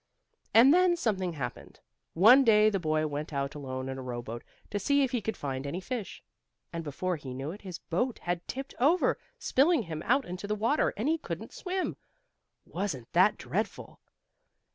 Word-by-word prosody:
And 250 +6 +7
then 360 0 +4
something 190 - -1
happened. 130 -6 -6 0.4
One 235 +10 +8
day 215 -2 +5
the 195 - 0
boy 155 -2 0
went 150 +1 -4
out 140 -1 -2
alone 130 -2 -5
in 135 0 -5
a - - -5
rowboat 120 -2 -6 0.3
to 205 - -1
see 280 +7 +3
if 265 - 0
he 245 -3 0
could 220 +2 -3
find 135 -1 -4
any 165 +6 -3
fish. 220 +1 -5 0.5
And 165 0 -3
before 170 +4 -2
he 130 -4 -8
knew 135 +4 -4
it 200 - -10
his 185 -4 -7
boat 235 +11 -2
had 175 0 -2
tipped 270 +1 -5
over, 310 +9 +3 0.2
spilling 285 0 +3
him 160 -4 -5
out 270 +3 +3
into 180 +3 -6
the 210 - 0
water, 230 +8 +2
and 220 +6 -1
he 325 +1 +2
couldn't - - -6
swim. 370 0 -3 0.7
Wasn't 165 - -4
that - - +5
dreadful? - - -4
185 Hz, 185 wpm, -29 LUFS, -, 0.7 s, One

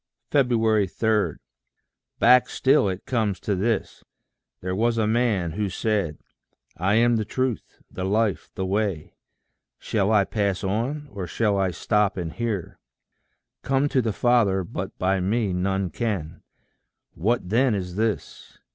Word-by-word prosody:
3. 115 - +2 1.3
Back 125 +1 +5
still 135 -6 +3
it 95 0 -5
comes 110 -7 0
to 100 - -1
this: 105 +2 -2 0.6
there 90 0 -3
was 115 +3 +1
a 110 - +2
man 110 -6 +1
Who 100 +4 -2
said, 95 -5 -1 0.6
"I 95 +5 +1
am 120 +1 +4
the 110 - 0
truth, 130 +2 -3
the 95 - -5
life, 100 -2 0
the 95 - -2
way:" 95 -4 -2 0.6
Shall 100 -1 0
I 105 -2 +5
pass 100 -3 -1
on, 120 +10 -2
or 100 -3 -5
shall 105 +3 0
I 95 -1 +1
stop 105 +3 0
and 85 -3 -4
hear? 110 -7 -3 0.8
"Come 135 +1 +1
to 130 - +2
the 115 -2 -1
Father 105 -4 +2
but 85 - -6
by 95 +1 +1
me 100 +1 0
none 95 0 -1
can:" 90 -7 -3 0.7
What 105 +1 -1
then 120 +2 +3
is 90 -2 -4
this? 110 +1 -3
105 Hz, 140 wpm, -24 LUFS, 95-115 Hz, 1.3 s, Back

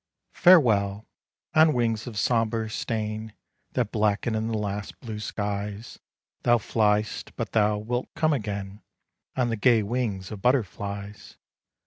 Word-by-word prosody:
Farewell! 110 - +4 0.5
on 155 0 +6
wings 115 -3 0
of 115 -4 -6
sombre 115 0 +1
stain, 110 -1 -3 0.4
That 120 -5 0
blacken 110 +1 +1
in 110 0 -1
the 115 -1 -1
last 100 -1 -4
blue 110 -4 -6
skies, 105 +1 -4 0.4
Thou 120 0 +4
fly'st; 105 -1 0
but - - -4
thou 105 -1 +3
wilt 120 +4 -3
come 155 -1 +2
again 100 -4 -4 0.5
On 125 -2 +1
the 115 - 0
gay 115 0 +4
wings 105 -4 -2
of 105 -3 -7
butterflies. 100 -4 -2
110 Hz, 130 wpm, -26 LUFS, 105-120 Hz, 0.5 s, on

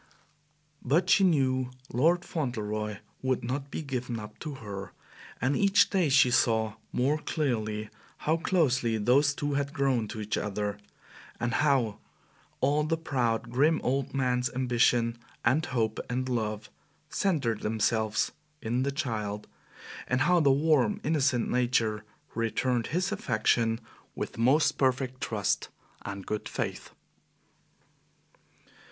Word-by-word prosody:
But 165 +8 +2
she 200 - +6
knew 130 -7 +2 0.2
Fauntleroy 120 - 0 0.2
would 130 -1 0
not 135 +4 -3
be 160 - -4
given 125 -4 -3
up 105 0 -10
to 150 -3 -5
her, 100 -5 -7 0.5
and 130 +4 +1
each 200 0 +4
day 185 -6 +2
she 130 -2 +5
saw 110 -3 +2 0.2
more 140 +5 +1
clearly 110 -9 -2 0.3
how 160 +2 +1
closely 130 -10 +1
those 140 +7 +3
two 145 0 -2
had 140 +1 -1
grown 135 -6 +1
to 110 - -6
each 105 +1 -2
other, 105 0 -3 0.6
and 120 0 -1
how 135 -8 +2 0.6
all 145 +3 +3
the 165 +2 0
proud, 120 -7 -1
grim 150 +6 +3
old 135 +1 0
man's 125 -2 +1
ambition 120 -2 +2 0.3
and 150 +6 +3
hope 115 -4 -1
and 130 +1 -1
love 110 -3 -2 0.4
centered 140 - 0
themselves 110 0 +1 0.3
in 120 +1 -1
the 140 +1 0
child, 105 -6 -3 0.6
and 125 +1 +1
how 180 +4 +4
the 140 -4 +4
warm, 155 +7 +3
innocent 140 -6 +1
nature 115 -4 +1 0.3
returned 115 +1 0
his 180 +6 -1
affection 115 - +1 0.4
with - - -4
most 145 +5 +3
perfect 130 -1 0
trust 105 -3 -1 0.3
and 100 -1 -6
good 105 0 -3
faith. - - -4
125 Hz, 125 wpm, -29 LUFS, 110-145 Hz, 0.6 s, she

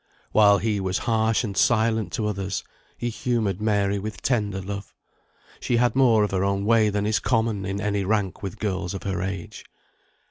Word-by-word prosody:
While 105 -2 +6
he 105 +2 -1
was 95 -1 -1
harsh 110 0 +2
and 100 -4 -4
silent 110 -1 +2
to 110 - -1
others, 100 -2 -2 0.3
he 120 - -2
humoured 110 -5 -1
Mary 100 -2 +1
with 105 +2 -7
tender 105 -6 0
love; 100 +1 -7 0.6
she 120 - 0
had 120 -1 +2
more 120 -5 +5
of 105 - -1
her 95 -1 0
own 100 0 0
way 110 -1 +4
than 105 0 -1
is 110 0 +1
common 110 -5 0
in 100 +1 -3
any 100 -1 -1
rank 100 -1 -1
with 95 -4 -5
girls 95 -3 -2
of - - -6
her 95 -1 -2
age. 95 -2 -5
105 Hz, 185 wpm, -24 LUFS, 100-110 Hz, 0.6 s, While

